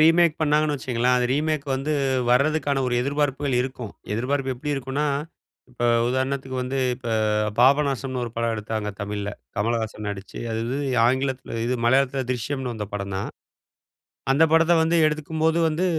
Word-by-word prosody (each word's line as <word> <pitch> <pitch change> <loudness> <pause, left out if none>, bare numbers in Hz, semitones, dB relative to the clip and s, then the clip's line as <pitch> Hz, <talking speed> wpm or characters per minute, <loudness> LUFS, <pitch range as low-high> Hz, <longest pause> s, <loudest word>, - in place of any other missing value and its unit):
Remake 165 0 +5
பண்ணாங்கணு 150 0 +2
வச்சுக்கோங்களேன், 125 -2 +1
அது 125 - +1
remake 150 +2 0
வந்து 135 +3 -2 0.4
வர்றதுக்கான 140 +2 +2
ஒரு 125 - 0
எதிர்பார்ப்புகள் 140 0 0
இருக்கும். 125 -4 -5 0.2
எதிர்பார்ப்பு 130 +4 -1
எப்படி 145 +4 -3
இருக்குன்னா? 135 +2 -2 0.7
இப்ப 125 -1 -7 0.3
உதாரணத்துக்கு 130 +1 -2
வந்து 130 +2 -2 0.2
இப்ப 125 -1 -8 0.5
பாபநாசம்ன்னு 135 -1 +3
ஒரு 120 - -6
படம் 115 0 0
எடுத்தாங்க 105 0 -3
தமிழ்ல. 100 0 -3 0.3
கமலஹாசன் 110 0 -1
நடிச்சு, 100 -1 -7
அது 110 - -1
வந்து 140 +1 -2 0.2
ஆங்கிலத்தில 130 -2 -1
இது 125 +1 0
மலையாளத்தில 135 +2 +2
திரிஷ்யம்ன்னு 125 +1 -2
வந்த 105 -2 -4
படம் 100 -1 -4
தான். 95 - -3 1.0
அந்த 150 +4 +4
படத்த 165 +1 +5
வந்து 165 +1 +2
எடுக்கும்போது 160 +2 0
வந்து 160 +4 0
130 Hz, 145 wpm, -24 LUFS, 120-145 Hz, 1.0 s, Remake